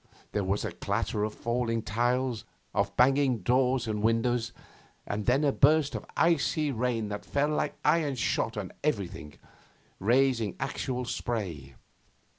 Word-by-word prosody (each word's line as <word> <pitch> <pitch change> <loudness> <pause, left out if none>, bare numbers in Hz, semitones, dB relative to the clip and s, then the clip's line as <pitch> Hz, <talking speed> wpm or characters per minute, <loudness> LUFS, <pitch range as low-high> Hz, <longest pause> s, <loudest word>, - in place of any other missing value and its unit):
There 105 - -1
was 100 +3 -1
a 110 - -3
clatter 105 +4 -2
of 105 0 -2
falling 115 -1 -1
tiles, 120 +2 0 0.3
of 100 0 -1
banging 130 -3 +3
doors 125 +1 +2
and 105 -1 -2
windows, 115 +1 +1 0.5
and 105 0 -3
then 130 +4 +3
a 145 - +4
burst 150 +1 +4
of - - -5
icy 155 -2 +2
rain 115 -3 -1
that 105 0 -5
fell 145 +1 0
like 150 -1 -1
iron 150 -2 +3
shot 115 -2 -1
on 100 -3 -4
everything, 95 - -2 0.6
raising 120 -1 +2
actual 125 -1 -2
spray. 90 - -4
120 Hz, 140 wpm, -29 LUFS, 105-135 Hz, 0.6 s, a